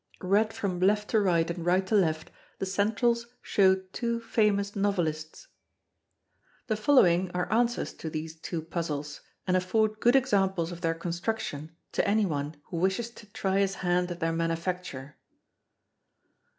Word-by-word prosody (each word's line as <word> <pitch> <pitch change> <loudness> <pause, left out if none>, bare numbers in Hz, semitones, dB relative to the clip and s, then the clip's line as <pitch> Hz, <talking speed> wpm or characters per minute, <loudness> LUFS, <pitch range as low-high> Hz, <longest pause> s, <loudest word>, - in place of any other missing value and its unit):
Read 205 +4 +3
from 185 -5 -3
left 210 +3 +2
to 220 - +4
right 170 -5 +2
and 170 -1 -5
right 180 +2 +2
to 205 - -4
left, 160 -6 +1 0.3
the - - -2
centrals 225 +5 +1 0.2
show 190 -2 +4 0.2
two 235 -1 -1
famous 210 -3 +1
novelists. 175 - -2 1.2
The 220 - 0
following 190 -7 +4
are 180 +3 -1
answers 240 +1 +1
to 160 - -3
these 155 +1 -5
two 165 -1 -4
puzzles, 150 -3 -4 0.2
and 185 - +1
afford 215 +4 +1
good 240 +4 +4
examples 195 -9 +2
of 175 0 -8
their 165 -2 0
construction 170 -2 -4 0.2
to - - 0
any 210 +1 +3
one 150 -2 -3 0.2
who 170 - -3
wishes 190 +7 0
to 220 -2 -14
try 195 -1 -1
his 195 -1 +1
hand 180 0 +2
at 175 -1 -5
their 165 0 0
manufacture. 165 -4 -3
185 Hz, 150 wpm, -28 LUFS, 165-210 Hz, 1.2 s, to